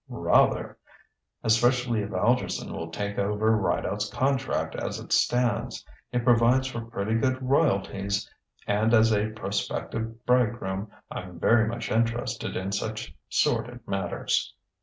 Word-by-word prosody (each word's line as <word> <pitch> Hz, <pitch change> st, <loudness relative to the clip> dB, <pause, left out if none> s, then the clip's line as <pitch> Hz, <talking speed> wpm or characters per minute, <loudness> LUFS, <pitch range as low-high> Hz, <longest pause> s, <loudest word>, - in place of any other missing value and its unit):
"Rather! -, -, +2 dB, 0.6 s
Especially 120 Hz, 0 st, +3 dB
if 100 Hz, -, -4 dB
Algerson 120 Hz, +3 st, 0 dB
will 80 Hz, 0 st, -5 dB
take 100 Hz, +4 st, -4 dB
over 105 Hz, +2 st, +2 dB
Rideout's 105 Hz, 0 st, -1 dB
contract 135 Hz, 0 st, 0 dB
as -, -, -3 dB
it -, -, -11 dB
stands. 120 Hz, 0 st, +1 dB, 0.3 s
It 125 Hz, -1 st, 0 dB
provides 120 Hz, +2 st, +4 dB
for 125 Hz, -3 st, -4 dB
pretty 115 Hz, -2 st, -3 dB
good 130 Hz, +3 st, +1 dB
royalties, 100 Hz, -7 st, +1 dB, 0.4 s
and 110 Hz, +3 st, +3 dB
as 110 Hz, 0 st, +5 dB
a 105 Hz, +1 st, +1 dB
prospective 110 Hz, +2 st, -4 dB
bridegroom 110 Hz, -5 st, +1 dB, 0.2 s
I'm 90 Hz, -1 st, -7 dB
very 110 Hz, +3 st, +4 dB
much 120 Hz, +2 st, -4 dB
interested 115 Hz, +1 st, -1 dB
in 95 Hz, +1 st, -3 dB
such 110 Hz, +2 st, -3 dB, 0.2 s
sordid 120 Hz, -1 st, 0 dB
matters." 95 Hz, -1 st, -1 dB
110 Hz, 125 wpm, -27 LUFS, 105-120 Hz, 0.6 s, as